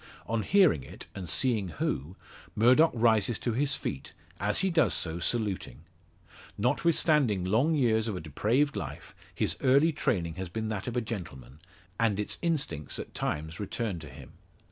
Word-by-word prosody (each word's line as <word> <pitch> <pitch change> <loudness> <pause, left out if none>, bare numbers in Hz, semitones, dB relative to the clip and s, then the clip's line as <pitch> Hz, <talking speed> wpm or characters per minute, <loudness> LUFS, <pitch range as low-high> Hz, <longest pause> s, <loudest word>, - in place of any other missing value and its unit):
On 115 -1 -1
hearing 180 - +4
it, - - -10
and 90 -4 -6
seeing 110 - +1
who, 75 +1 -3 0.4
Murdock 125 +9 +6
rises 110 -1 +3
to 120 - -2
his 135 +3 +1
feet, 70 - -5 0.3
as 105 - +1
he 190 -1 +1
does 160 -6 +3
so 85 0 -2
saluting. 100 - -2 0.8
Notwithstanding 150 - +2
long 120 - +2
years 115 -5 +2
of 105 - -2
a - - -4
depraved 115 - 0
life, - - -6 0.2
his - - 0
early 140 +5 +4
training 85 - -1
has 95 -2 -4
been 110 +4 -3
that 105 -1 -4
of 125 0 -2
a - - +2
gentleman, 75 - -7 0.4
and 110 -3 +2
its 105 - -3
instincts 140 - -1
at - - -7
times 80 +2 -3
return 105 -2 -3
to 75 - -10
him. - - -12
110 Hz, 165 wpm, -29 LUFS, 90-130 Hz, 0.8 s, Murdock